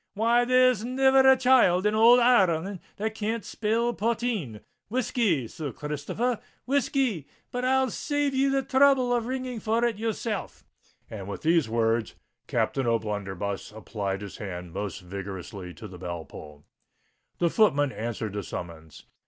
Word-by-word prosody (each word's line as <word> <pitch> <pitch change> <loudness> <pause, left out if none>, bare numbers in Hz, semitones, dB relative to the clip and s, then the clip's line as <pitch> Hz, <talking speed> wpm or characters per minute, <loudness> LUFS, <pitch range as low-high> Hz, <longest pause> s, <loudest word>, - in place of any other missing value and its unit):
"Why, 235 +3 +3
there's 255 -3 +4
niver 265 +2 +4
a 265 - +5
child 250 -8 +4
in 210 - +2
ould 230 +3 +7
Ir 240 -5 +5
reland 175 +4 -3 0.2
that 220 +2 -2
can't 220 +1 -3
spell 230 +2 0
potheen. 220 - -2 0.3
Whiskey, 215 - 0
Sir 145 +3 -6
Christopher—whiskey! 230 - -2 0.2
But 250 0 -2
I'll 265 -1 +2
save 290 -1 -1
ye 270 +1 +2
the 270 0 +1
throuble 265 -2 +4
of 235 -1 -1
ringing 255 -2 -4
for 225 +3 +1
it 230 -3 -1
yourself:"—and, 210 - -6
with 100 - -6
these 165 -5 +3
words, 115 0 0 0.3
Captain 135 -3 0
O'Blunderbuss 100 -4 -2
applied 100 -2 -4
his 100 -2 -8
hand 90 -4 -7
most 100 -1 -4
vigorously 95 0 -7
to 110 - -9
the 90 -3 -11
bell 85 -3 -5
pull. 75 +1 -12 0.7
The 170 -1 +1
footman 145 - +3
answered 110 -3 -4
the 105 - -3
summons. 80 -4 -8
200 Hz, 145 wpm, -27 LUFS, -, 0.7 s, ould